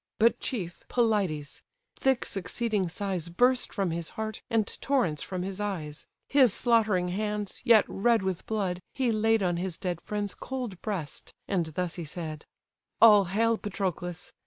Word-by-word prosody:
But 230 +2 +4
chief, 180 -9 -4
Pelides: 200 - 0 0.3
thick 265 -2 +1
succeeding 200 0 -1
sighs 185 -2 -2
Burst 245 +8 +3
from 195 -4 -1
his 165 0 -3
heart, 220 -1 -4
and 225 -2 +2 0.2
torrents 190 - +1
from 185 -1 -4
his 195 +1 -4
eyes: 160 -8 -4 0.2
His 265 -5 +5
slaughtering 215 -7 +3
hands, 210 +1 -3
yet 225 -2 +6
red 230 +1 +2
with 190 -2 -3
blood, 195 -5 -1 0.2
he 255 -3 +1
laid 220 -1 +2
On 175 -2 +1
his 180 -1 -3
dead 175 -3 -3
friend's 205 -1 -3
cold 250 -8 -5
breast, 180 -10 -4
and 180 -5 0
thus 175 +3 -3
he 170 - -4
said: 155 -1 -6 0.5
"All 210 -3 +8
hail, 225 +5 +1
Patroclus! 180 -3 -4
195 Hz, 155 wpm, -28 LUFS, 175-225 Hz, 0.5 s, All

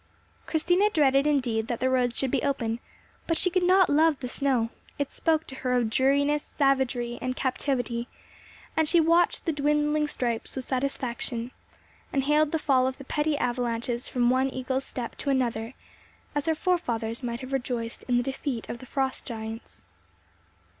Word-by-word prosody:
Christina 355 +6 +3
dreaded 280 -5 +3
indeed 240 -7 +1
that 240 -2 -2
the 255 - +1
roads 250 -2 +1
should 265 -2 0
be - - +1
open, 240 -5 -1 0.5
but 330 - +2
she 365 +2 +3
could 370 +1 +2
not 370 +1 +5
love 305 0 +3
the 250 - -4
snow; 250 -3 0 0.3
it 285 -1 -2
spoke 320 -1 +1
to - - -8
her 250 -1 -1
of 235 -3 +1
dreariness, 285 +4 +2
savagery, 265 -4 +1
and 255 0 -2
captivity, 245 -3 -1 0.7
and 320 -1 +2
she 345 - +5
watched 335 +2 +3
the 330 - +2
dwindling 300 +1 +1
stripes 235 -5 -2
with 260 -2 -4
satisfaction, 250 -2 -2 0.6
and 270 - +1
hailed 300 +1 +3
the 320 - +1
fall 260 -4 +3
of 260 - -3
the 275 - -9
petty 295 +1 0
avalanches 240 -1 -1
from 245 -1 +2
one 260 +1 +2
Eagle's 260 +1 -2
Step 240 -2 -6
to 280 - -3
another 240 -3 0 0.6
as 290 +1 -2
her 320 - +3
forefathers 240 - -1
might 240 0 -4
have 260 +1 -7
rejoiced 245 -3 -3
in 245 -1 +3
the 245 - +2
defeat 265 -2 -3
of 235 - -5
the 255 - -11
Frost 265 0 -2
giants. 225 -1 -7
265 Hz, 175 wpm, -27 LUFS, 240-295 Hz, 0.7 s, not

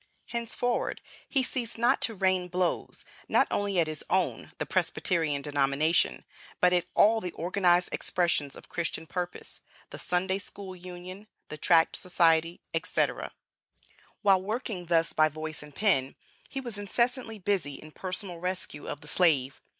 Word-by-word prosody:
Henceforward, 235 +1 -1 0.3
he 270 -3 +3
ceased 240 -2 -3
not 240 +4 +3
to 225 - +4
rain 185 -1 +1
blows, 180 0 -2 0.2
not - - +4
only 200 -2 0
at 165 - +4
his 155 -1 -2
own - - 0
(the - - -2
Presbyterian) 155 -5 0
denomination, 145 +3 +1 0.3
but 180 0 +4
at 175 -1 +2
all 220 +2 +5
the 180 -3 -5
organized 180 +1 +2
expressions 170 -6 0
of - - -11
Christian 165 -1 -3
purpose, 180 +1 -5 0.3
the - - -7
Sunday 190 +2 0
School 195 -1 -8
Union, 180 +3 -9 0.2
the 150 - -6
Tract 165 0 +4
Society, 165 -1 +4
etc. - - 0 0.9
While 195 -2 +5
working 210 -3 -4
thus 165 -1 +2
by 155 0 +4
voice 155 +1 -6
and 150 -1 -13
pen, 140 -11 +2 0.3
he 270 - -4
was 240 -6 -4
incessantly 235 +2 0
busy 185 -8 -1
in 155 - -11
personal 185 0 -5
rescue 180 -4 -4
of 145 - -5
the 150 - -11
slave. 150 -5 +3
180 Hz, 150 wpm, -28 LUFS, 160-200 Hz, 0.9 s, all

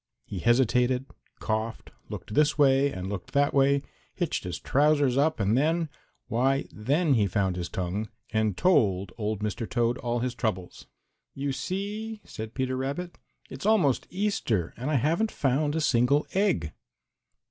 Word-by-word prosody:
He 100 - -5
hesitated, 125 +3 +2 0.3
coughed, 110 +1 -3 0.2
looked - - -7
this 150 +1 +3
way 140 -1 +4
and 95 -4 -5
looked 95 -2 -6
that 145 0 +3
way, 140 0 +3 0.3
hitched - - -2
his - - -3
trousers 145 -2 +3
up, 150 +2 +2
and 100 +2 +2
then, 160 +4 +1 0.4
why 135 +4 +1
then 145 +8 +1
he 105 -5 +3
found 95 -1 0
his 90 -1 -4
tongue 95 +4 -3 0.2
and 110 -3 +1
told 100 - +2
old 105 -1 -2
Mr. 105 +1 -3
Toad 120 0 +1
all 120 -2 -1
his 125 +1 -1
troubles. 105 -7 -4 0.5
"You 140 +1 -2
see," 210 +8 -4
said 110 0 -8
Peter 130 -1 -1
Rabbit, 140 +7 -4 0.3
"it's - - -5
almost 180 - +3
Easter 180 - -1
and 130 +5 -4
I 155 - +1
haven't 165 - +2
found 145 +2 0
a 160 - 0
single 140 +1 +3
egg." 190 - +1
130 Hz, 155 wpm, -27 LUFS, 110-150 Hz, 0.5 s, way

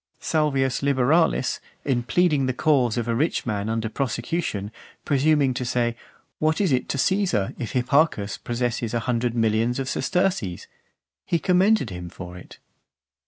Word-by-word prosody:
Salvius 135 -4 0
Liberalis, 140 +2 +2 0.3
in 130 -4 +1
pleading 150 0 +2
the 130 - -1
cause 130 -6 +2
of 120 -1 -1
a 115 - +1
rich 150 +8 0
man 105 -2 -2
under 115 0 -1
prosecution, 120 - -2 0.3
presuming 145 -1 +3
to 125 - -3
say, 120 -1 0 0.4
"What 155 +1 +1
is 195 -6 +2
it 125 -1 0
to - - -1
Caesar, 180 - +1
if 115 - -4
Hipparchus 125 -4 +1
possesses 120 -1 -2
a 115 - 0
hundred 120 -1 -1
millions 115 +1 +1
of 135 -1 -3
sesterces?" 180 - -1 0.6
he 170 - 0
commended 185 - +2
him 90 -1 -6
for 90 0 -9
it. 90 - -12
125 Hz, 150 wpm, -24 LUFS, 115-155 Hz, 0.6 s, presuming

